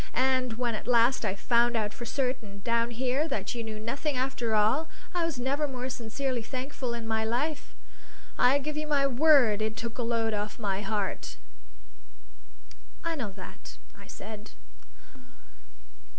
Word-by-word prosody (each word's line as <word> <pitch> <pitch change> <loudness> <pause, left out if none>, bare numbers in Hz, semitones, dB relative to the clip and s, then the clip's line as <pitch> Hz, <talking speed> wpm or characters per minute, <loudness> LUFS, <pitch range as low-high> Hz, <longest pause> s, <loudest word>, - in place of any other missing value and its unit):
And 255 -1 +2
when 240 0 -1
at 215 - -5
last 240 +1 +4
I 190 - 0
found 235 +3 +3
out 210 -1 -1
for 240 - -7
certain, 235 -6 -2
down 230 0 +2
here, 255 +5 0
that 280 -3 -2
you 235 -1 -3
knew 220 -1 -5
nothing 270 +6 -2
after 245 -4 0
all, 230 +10 +3 0.2
I 350 -1 +1
was 330 -5 -1
never 275 +4 0
more 255 -1 -4
sincerely 245 +2 -2
thankful 255 0 -4
in 230 -1 -5
my 220 0 +1
life. 280 +7 -1 0.6
I 255 +3 +5
give 300 +2 -3
you 305 0 -2
my 285 -2 +3
word 265 -5 +5
it 220 +1 -1
took 235 +1 -4
a - - +2
load 230 -1 +1
off 210 0 -3
my 200 -3 -1
heart." 205 -1 -2 1.7
"I 335 - 0
know 260 -10 -3
that," 190 -2 -10 0.2
I - - -14
said. 215 -1 -9
240 Hz, 160 wpm, -29 LUFS, 220-270 Hz, 1.7 s, I